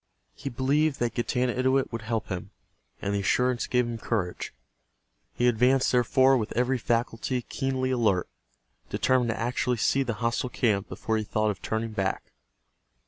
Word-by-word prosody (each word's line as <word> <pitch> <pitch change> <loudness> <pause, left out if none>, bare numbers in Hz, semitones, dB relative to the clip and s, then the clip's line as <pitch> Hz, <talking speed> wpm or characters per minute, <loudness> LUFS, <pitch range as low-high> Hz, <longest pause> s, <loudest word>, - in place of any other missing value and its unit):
He 140 - -6
believed 140 +4 +1
that 120 -1 -1
Getanittowit 130 +2 +1
would 115 -1 -4
help 110 -1 -3
him, 90 -3 -4 0.5
and 100 - -1
the 100 - +1
assurance 125 +5 +1
gave 125 -1 +2
him 120 -1 -4
courage. 100 -6 -2 0.8
He 120 - +1
advanced, 125 +3 +3
therefore, 130 +2 +4
with 110 - -3
every 125 +1 +2
faculty 120 +2 -1
keenly 130 -1 -2
alert, 110 -8 +2 0.6
determined 130 -2 +2
to 110 - -2
actually 120 +1 0
see 135 +4 +2
the 120 -4 -1
hostile 115 +4 -1
camp 105 -5 0
before 110 -1 -2
he 110 - -1
thought 110 0 0
of 100 - -8
turning 110 +1 -2
back. 100 -3 -2
120 Hz, 155 wpm, -27 LUFS, 110-130 Hz, 0.8 s, therefore